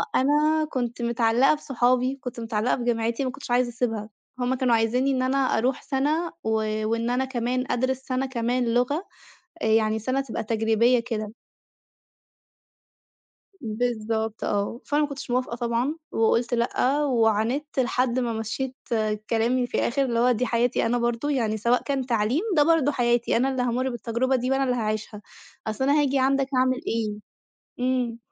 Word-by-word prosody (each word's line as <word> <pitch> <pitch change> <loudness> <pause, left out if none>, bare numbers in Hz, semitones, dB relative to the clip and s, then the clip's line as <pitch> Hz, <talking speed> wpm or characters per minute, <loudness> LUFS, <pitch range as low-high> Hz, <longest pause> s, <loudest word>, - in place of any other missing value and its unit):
أنا 300 +3 +3
كنت 240 -2 -3
متعلّقة 235 +3 +3
بصُحابي، 255 -2 +1
كنت 245 -1 -6
متعلّقة 225 +1 0
بجامعتي، 235 +1 -1
ما 255 - -1
كنتش 275 -2 -9
عايزة 245 0 +3
أسيبها. 225 -3 -2 0.3
هُم 250 +1 0
كانوا 250 -2 +2
عايزينّي 245 +4 +1
إن 260 -1 0
أنا 260 +2 +1
أروح 260 -1 +1
سنة 300 +5 0
و 220 - -1 0.4
وإن 230 +1 -1
أنا 255 +2 +1
كمان 255 0 -2
أدرس 260 +1 0
سنة 260 0 -2
كمان 245 -1 -1
لغة 285 +9 +1 0.6
آآ، - - 0
يعني 220 0 +3
سنة 255 +5 -1
تبقى 260 -5 -4
تجريبية 225 +2 +2
كده. 215 -2 -3 2.3
بالضبط، 220 -1 -2
آه. 205 +3 -1
فأنا 295 +1 +1
ما 295 - 0
كُنتش 275 -3 -7
موافقة 250 -1 -1
طبعًا، 240 +4 -1 0.2
وقُلت 230 +2 +2
لأ، 255 +4 +1
وعانِدت 240 +4 +1
لحد 250 0 +1
ما 240 -2 0
مشِّيت 225 +4 -4 0.5
كلامي 240 +2 +1
في - - -21
الآخر، 275 +3 +1
اللي 235 -2 -1
هو 250 +1 +4
دي 250 +2 0
حياتي 240 0 +1
أنا 240 +1 +1
برضه. 240 +4 -1
يعني 225 -6 0
سواء 235 +4 +1
كان 270 -3 -2
تعليم 235 - +1
ده 295 - +6
برضه 310 -2 +3
حياتي، 240 -2 +1
أنا 255 +3 +2
اللي 260 -2 -1
هامُرّ 250 +2 0
بالتجربة 240 +3 0
دي 250 +1 -2
وأنا 270 0 +2
اللي 250 -1 +1
هاعيشها، 215 -1 -3 0.4
أصلً 220 +5 -2
أنا 285 +2 +4
هاجي 275 -1 +1
عندك 270 +1 +2
أعمل 255 0 +2
إيه؟ 220 -2 -1 0.7
إمم. 250 -2 0
245 Hz, 160 wpm, -25 LUFS, 230-265 Hz, 2.3 s, ده